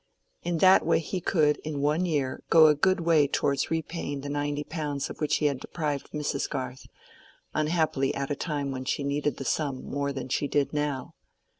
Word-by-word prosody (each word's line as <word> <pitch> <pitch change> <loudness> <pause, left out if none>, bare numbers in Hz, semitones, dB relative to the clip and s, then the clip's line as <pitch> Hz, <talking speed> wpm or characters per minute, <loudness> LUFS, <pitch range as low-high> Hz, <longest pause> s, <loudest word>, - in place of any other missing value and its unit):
In 175 -1 -1
that 185 +3 +6
way 165 - +3
he 180 +3 -3
could, 150 -4 +2
in 150 -2 -5
one 150 +5 +1
year, 140 -5 -1
go 160 -1 +8
a 155 - +7
good 185 +5 +2
way 160 -3 +4
towards 140 0 0
repaying 160 -3 -3
the 145 - -6
ninety 145 0 -2
pounds 150 -3 -3
of - - -11
which 150 - +2
he 150 - 0
had 140 -3 +1
deprived 150 -3 -3
Mrs. 150 -2 -2
Garth, 130 -2 -5 0.7
unhappily 155 -3 +1
at 140 +1 -3
a - - +1
time 145 -3 -2
when 130 -1 -4
she 140 - -1
needed 140 -1 -1
that 135 - -6
sum 140 -4 -1
more 140 0 -2
than 135 -2 -5
she 145 +2 0
did 145 +1 0
now. 145 -3 -2
145 Hz, 195 wpm, -27 LUFS, 140-155 Hz, 0.7 s, go